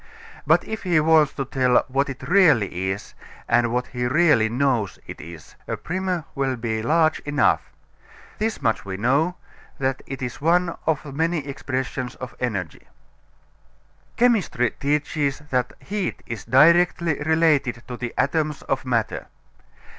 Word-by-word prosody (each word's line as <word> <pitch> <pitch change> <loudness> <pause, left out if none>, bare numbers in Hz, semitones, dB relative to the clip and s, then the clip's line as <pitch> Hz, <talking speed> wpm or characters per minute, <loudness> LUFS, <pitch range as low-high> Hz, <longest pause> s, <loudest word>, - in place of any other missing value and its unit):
But - - +4
if 220 0 -5
he 175 -4 +2
wants 155 -2 +4
to 135 - -3
tell 130 -1 +2
what 135 +2 0
it 130 - -7
really 115 - +3
is, 95 +1 -5 0.3
and 120 -1 +2
what 125 +1 0
he 125 -1 -2
really 145 -6 +4
knows 120 -5 0
it - - -9
is, 85 -1 -11
a - - -3
primer 180 -2 -3
will 135 -1 -1
be 115 -2 -2
large 160 +5 +2
enough. 145 0 +1 0.7
This 220 +1 -2
much 115 - +1
we 95 -1 -5
know 140 - +1 0.4
that 130 -1 -1
it 135 -1 -6
is 125 +1 -5
one 170 +2 +2
of 150 -3 -1
many 160 0 0
expressions 130 -2 -4
of 130 -2 -8
energy. 100 -10 -4 1.3
Chemistry 210 - +2
teaches 145 -1 -1
that 125 -1 0
heat 200 -2 -4
is 110 -4 -6
directly 170 +2 +4
related 150 -6 +2
to 125 - -5
the 120 -1 -5
atoms 150 +2 0
of 135 -1 -2
matter. 120 -4 -1
135 Hz, 145 wpm, -23 LUFS, 125-160 Hz, 1.3 s, But